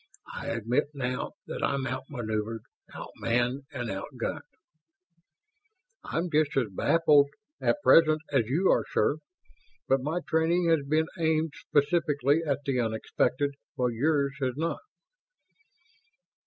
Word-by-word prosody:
"I - - -6
admit 115 +2 0
now 125 -2 -3
that - - -6
I'm 140 -1 0
out 130 +1 -4
maneuvered, 110 -3 -3 0.3
out - - -8
manned, 125 +4 0
and 125 -5 -4
out 95 0 -4
gunned." - - -2 1.6
"I'm 170 +1 -2
just 150 -2 +2
as 120 -5 +1
baffled 145 - +4 0.3
at 295 - +1
present 155 -1 +6
as 125 -6 +2
you 165 +10 +2
are, - - +3
sir. 145 - +2 0.7
But 135 0 +3
my 160 +6 -2
training 170 +2 +2
has 165 -1 +4
been 155 +1 +3
aimed 160 -1 +1
specifically 145 -1 +1
at 145 -3 -1
the 135 -2 0
unexpected, 125 +4 0 0.2
while 125 -1 0
yours 140 +3 +1
has 130 -2 0
not." 165 +2 -1
140 Hz, 130 wpm, -28 LUFS, 125-155 Hz, 1.6 s, present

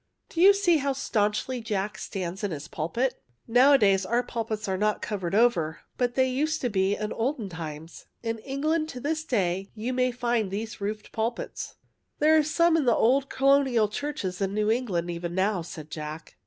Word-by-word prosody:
^' - - -17
Do 335 - 0
you 390 +2 +9
see 395 -4 +3
how 280 -1 0
staunchly 230 0 -1
Jack 210 -2 -3
stands 190 +1 -5
in 205 - 0
his 150 -2 -6
pulpit? 230 +14 -2 0.3
Nowadays 230 -6 +5
our 235 +6 +1
pulpits 220 -3 -4
are 190 - 0
not 210 +2 +1
covered 195 -3 -2
over, 180 -9 +2
but 245 -1 0
they 260 -1 +3
used 305 +5 0
to 245 - 0
be 195 0 +2
in 210 0 -3
olden 230 -3 -2
times. 160 -1 -8 0.2
In 225 -1 -2
England 305 +6 -1
to 250 - -7
this 310 +4 -2
day 195 - -1
you 230 +4 -3
may 255 0 +2
find 240 -4 0
these 215 +2 -5
roofed 210 +1 -4
pulpits." 230 +2 -3 0.2
'* - - -51
There 310 +1 +5
are 310 - +6
some 330 +2 +3
in 315 -4 +2
the 240 - +4
old 265 +4 +3
Colonial 270 -5 +3
churches 205 -6 -4
of 195 - +1
New 210 +2 +1
England 190 -8 -1
even 170 0 -4
now," 190 0 +1
said 160 -2 -9
Jack. 155 0 -7
225 Hz, 195 wpm, -27 LUFS, 190-265 Hz, 0.3 s, you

